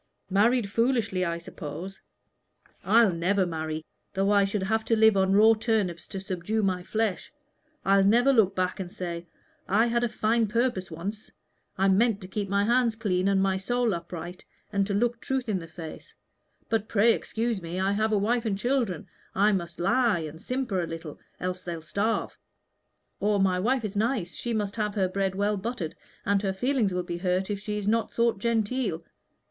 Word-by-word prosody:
Married 220 +3 +3
foolishly, 230 -5 +1
I 170 -2 -1
suppose. 170 +3 -8 0.8
I'll 220 -1 +5
never 185 +3 +1
marry, 160 -2 -4 0.3
though 195 +1 +2
I 200 -1 +5
should 195 0 -2
have 220 +3 0
to 225 - +2
live 220 -1 +5
on 190 0 +3
raw 220 +3 +7
turnips 215 -6 -1
to 195 - -5
subdue 190 +3 -2
my 185 -2 0
flesh. 215 0 -2 0.5
I'll 195 0 +5
never 240 +7 +5
look 215 -6 +3
back 185 0 -1
and 180 -2 -5
say, 175 -2 -5 0.4
'I 215 +4 +4
had 235 0 +1
a 240 - +1
fine 225 +1 +1
purpose 230 -4 0
once 195 +6 -6 0.5
I 195 +1 +3
meant 205 +2 +3
to 185 - -8
keep 200 +1 -3
my 200 +1 +2
hands 235 +1 +2
clean 195 -4 0
and 195 -1 +3
my 190 -1 +1
soul 240 +3 0
upright, 175 +1 -6 0.3
and 200 -1 +1
to 200 - -1
look 235 +2 0
truth 265 -2 -2
in 205 -4 0
the 165 - -9
face; 165 -1 -10 0.5
but 220 -2 0
pray 225 +2 +5
excuse 225 -2 -2
me, 170 +2 -4
I 190 +1 +1
have 215 +2 +1
a 210 - +3
wife 230 +4 +1
and 195 -2 0
children 235 - -1 0.3
I 205 +2 +4
must 170 -4 -3
lie 225 0 +2
and 160 +1 -7
simper 250 -8 -1
a 170 - -3
little, 165 -2 -7 0.2
else 185 0 -3
they'll 170 -3 -6
starve'; 205 +7 -1 0.8
or 205 0 +2
'My 185 -1 +2
wife 240 +4 +1
is 205 -1 -5
nice, 215 -4 0
she 240 - -3
must 210 -2 -2
have 210 -1 -1
her 190 -3 +2
bread 190 0 -1
well 205 +1 +1
buttered, 195 -5 -4 0.3
and 200 -1 +2
her 195 -2 -1
feelings 245 0 +1
will 180 0 -1
be 175 -1 -4
hurt 185 +2 0
if 200 - -2
she 210 0 -4
is 205 -1 -4
not 225 +1 +1
thought 235 -3 +1
genteel.' 225 -5 0
200 Hz, 190 wpm, -27 LUFS, 185-225 Hz, 0.8 s, raw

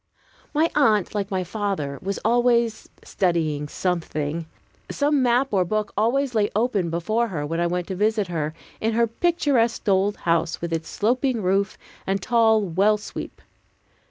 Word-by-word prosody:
My 315 +2 +2
aunt, 220 -10 +3
like 205 -1 -2
my 190 -3 -1
father, 185 -8 -3
was 195 +1 -3
always 235 -1 +2
studying 160 -6 0
something. 160 -2 -2 0.4
Some 290 -1 +1
map 250 +2 +2
or 190 -3 +3
book 210 +4 -2
always 250 +5 +1
lay 210 -2 +2
open 210 -6 +1
before 215 +8 0
her, 160 -8 -4
when 165 +3 -2
I 170 - +2
went 180 0 -2
to 190 - -2
visit 210 +1 +1
her, 160 -3 -3 0.2
in 225 +1 0
her 235 +1 +3
picturesque 250 -4 +1
old 200 +1 +2
house, 165 -1 0
with 170 -1 -4
its 165 -1 -3
sloping 245 +1 0
roof 195 +2 +1 0.3
and 195 +1 +1
tall 220 0 +3
well 200 +4 +2
sweep. 205 - -8
205 Hz, 155 wpm, -23 LUFS, 175-235 Hz, 0.4 s, aunt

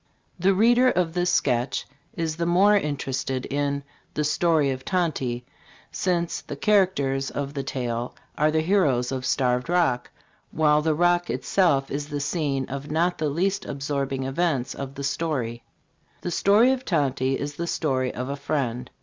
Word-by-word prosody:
The 190 +2 +3
reader 240 +5 +5
of 175 -7 0
this 180 0 +1
sketch 125 -5 +1 0.3
is 160 -2 -2
the 170 0 -1
more 195 +4 +5
interested 135 -6 -2
in 140 0 -1 0.3
"The 150 - 0
Story 150 -1 +2
of 130 0 -5
Tonty," 135 -10 -1 0.5
since 175 -2 -1
the - - -7
characters 140 -8 +2
of 140 0 -4
the 140 - -2
tale 120 -3 -3 0.2
are 150 +1 +3
the 155 0 +2
heroes 150 -9 +2
of 130 -1 -3
Starved 125 +1 +1
Rock, 170 -9 +1 0.4
while 150 -1 +3
the 155 0 +1
Rock 175 +1 +2
itself 150 -8 +1
is 145 +1 -3
the 145 -1 -3
scene 140 -3 -1
of 140 +2 -6
not 170 +4 +1
the 155 -1 0
least 190 +7 0
absorbing 140 -1 -3
events 135 -1 -1
of 135 0 -7
the 140 - -6
story. 140 -5 -2 0.6
"The 175 - -3
Story 210 +8 +4
of 260 -1 -1
Tonty" 135 - 0
is 145 0 -5
the 170 - -3
story 130 -6 0
of 125 +1 -5
a 140 - -3
friend. 125 -4 -2
145 Hz, 165 wpm, -25 LUFS, 135-175 Hz, 0.6 s, reader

